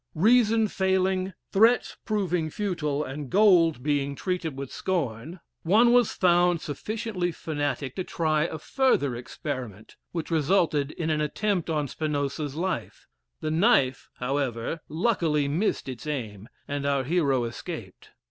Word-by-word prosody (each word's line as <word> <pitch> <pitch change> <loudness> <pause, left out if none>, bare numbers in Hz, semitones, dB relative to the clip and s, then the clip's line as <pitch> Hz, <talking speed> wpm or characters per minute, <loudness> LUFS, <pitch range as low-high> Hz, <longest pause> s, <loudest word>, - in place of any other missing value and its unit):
Reason 225 +3 +4
failing, 190 0 0 0.2
threats 225 +5 +4
proving 180 -7 0
futile, 150 -6 -2
and 135 0 -6
gold 175 - +4
being 140 -1 0
treated 170 -4 -3
with 135 -1 -6
scorn, 160 - -3 0.2
one 225 +8 +4
was 245 -3 +4
found 175 -1 +3
sufficiently 185 +4 -3
fanatic 145 -5 -3
to 185 - -1
try 155 -3 0
a 160 - -4
further 155 - +1
experiment, 120 -4 -6
which 170 -1 -4
resulted 155 -2 +2
in 160 +1 -3
an 155 -1 +1
attempt 185 +3 -1
on 150 -3 0
Spinoza's 145 0 -2
life; 185 +4 -3 0.4
the 155 - -2
knife, 160 - +2
however, 130 +2 -2
luckily 160 -5 +1
missed 165 +6 -1
its 130 +3 -7
aim, 110 -7 -5 0.2
and 140 0 -2
our 140 -1 +1
hero 140 -4 +1
escaped. 115 0 -7
155 Hz, 130 wpm, -26 LUFS, 140-185 Hz, 0.4 s, Reason